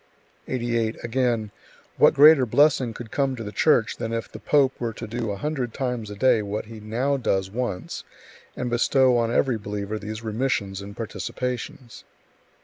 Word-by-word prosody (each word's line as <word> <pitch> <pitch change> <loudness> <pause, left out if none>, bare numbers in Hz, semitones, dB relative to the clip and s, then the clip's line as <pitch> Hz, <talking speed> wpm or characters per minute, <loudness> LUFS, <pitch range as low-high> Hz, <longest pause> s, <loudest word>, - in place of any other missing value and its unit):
88. 115 -3 -1
Again: 120 -3 0 0.5
"What - - +5
greater 145 -2 +7
blessing 135 0 +3
could 120 -3 -8
come 135 -2 0
to 115 - -6
the 105 - -6
Church 120 -3 +2
than 115 - -4
if 115 0 -3
the - - -9
pope 140 -3 +3
were 115 -2 -2
to - - -7
do 115 0 -3
a 100 - -2
hundred 130 -1 -3
times 125 -5 -3
a 105 - -7
day 120 +1 +3
what 105 +1 -4
he 110 0 -10
now 120 +7 -1
does 95 -6 -1
once, 120 -5 -4 0.5
and 125 - -3
bestow 125 +2 +3
on 115 0 0
every 120 -1 +1
believer 105 +1 -4
these 110 +2 -6
remissions 110 -4 -1
and 100 +1 -10
participations?" 125 +2 -5
115 Hz, 170 wpm, -24 LUFS, 110-130 Hz, 0.5 s, greater